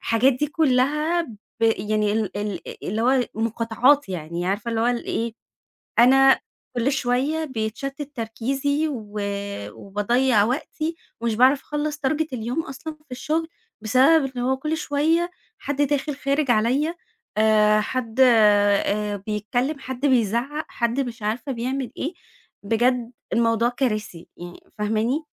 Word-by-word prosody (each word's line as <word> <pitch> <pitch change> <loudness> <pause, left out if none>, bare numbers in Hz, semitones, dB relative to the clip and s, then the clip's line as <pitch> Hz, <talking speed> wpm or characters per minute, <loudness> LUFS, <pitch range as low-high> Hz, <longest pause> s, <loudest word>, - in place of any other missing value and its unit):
الحاجات 240 +4 +3
دي 295 +5 -1
كلّها 300 +3 +2
ب 235 -10 -10 0.3
يعني 215 -1 +1
ال 215 -3 -2
ال 205 -4 -3 0.2
اللي 220 +4 -1
هو 260 +1 +4
مقاطعات 230 +4 +2
يعني، 175 0 -4
عارفة 205 +5 -1
اللي 225 - -1
هو 230 - +2
إيه؟ 235 -1 -1 0.7
أنا 270 +2 +6 0.4
كل 250 +4 +2
شويّة 275 +5 0
بيتشتت 270 +4 -4
تركيزي، 270 +6 -1
و 215 -7 -5 0.5
وباضيّع 210 - +1
وقتي، 310 +7 -2 0.3
ومش 230 -2 0
باعرف 265 +4 +5
أخلص 295 0 -3
target 310 +2 0
اليوم 250 +6 -2
أصلًا 275 +4 -7
في 300 -2 -27
الشغل 310 +6 -1 0.3
بسبب 270 +5 +4
إن 245 - -2
هو 265 +2 +1
كل 305 +4 -2
شويّة 320 +4 +1 0.3
حد 285 +1 -2
داخل 290 0 0
خارج 275 0 0
عليَّ، 255 +9 +2 0.4
آآ، 215 -1 +4
حد 240 +1 -4
آآ، 210 -3 +4
بيتكلّم، 245 +7 -1
حد 260 +1 -4
بيزعق، 255 +4 +1
حد 235 +2 -1
مش 245 -3 -3
عارفة 225 +7 -2
بيعمل 255 0 -3
إيه. 315 +6 -3 0.5
بجد 240 +3 +1 0.2
الموضوع 230 0 +2
كارثي 215 -9 -3
يعني، 175 0 -9 0.2
فاهماني؟ 220 +8 0
245 Hz, 130 wpm, -23 LUFS, 220-280 Hz, 0.7 s, أنا